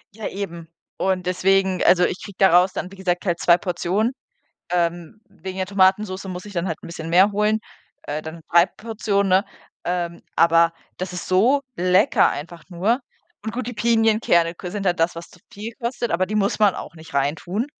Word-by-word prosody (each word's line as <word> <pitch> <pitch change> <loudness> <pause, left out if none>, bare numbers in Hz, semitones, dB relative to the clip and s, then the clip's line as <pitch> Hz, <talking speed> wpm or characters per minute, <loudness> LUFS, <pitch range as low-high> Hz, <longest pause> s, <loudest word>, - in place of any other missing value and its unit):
Ja, 220 - -5
eben. 170 -4 -6 0.3
Und 185 -1 0
deswegen 190 +1 +2
also, 180 0 +5
ich - - -3
kriege 200 -3 -10
daraus 185 0 +5
dann, 185 - -5
wie 195 - -11
gesagt, 180 -1 -2
halt 175 -2 0
2 175 0 +5
Portionen, 185 +5 -1 0.6
ähm, 175 +3 -1
wegen 190 0 -9
der 190 - -1
Tomatensoße 190 0 +1
muss 180 0 -6
ich 205 - -10
dann 180 0 -2
halt 160 - -2
'n - - -9
bisschen 165 -1 -7
mehr 190 +5 +5
holen, 210 +1 +1 0.4
äh, 150 +1 -4
dann 160 +1 -9
3 170 +1 +6
Portionen, 210 -3 -2
ne? 190 +2 +4 0.4
Ähm, 175 -1 -2 0.2
aber 170 0 +4 0.2
das 180 -1 -4
ist 180 - -6
so 240 +10 +3
lecker 185 +7 +4
einfach 165 +4 -6
nur. 200 +8 0 0.4
Und 220 +1 -5
gut, 255 -2 -3
die 245 - -4
Pinienkerne 220 -6 +2
ko 180 - -7
sind 200 +1 -4
halt 180 -2 +1
das, 165 +2 +2
was 170 0 -9
zu 180 - -19
viel 215 +3 -7
kostet, 240 0 -2
aber 185 +2 +1
die 215 - -5
muss 200 -1 +1
man 210 -3 +4
auch - - -8
nicht 160 -1 -14
reintun. 165 - -1
185 Hz, 195 wpm, -22 LUFS, 170-205 Hz, 0.6 s, 3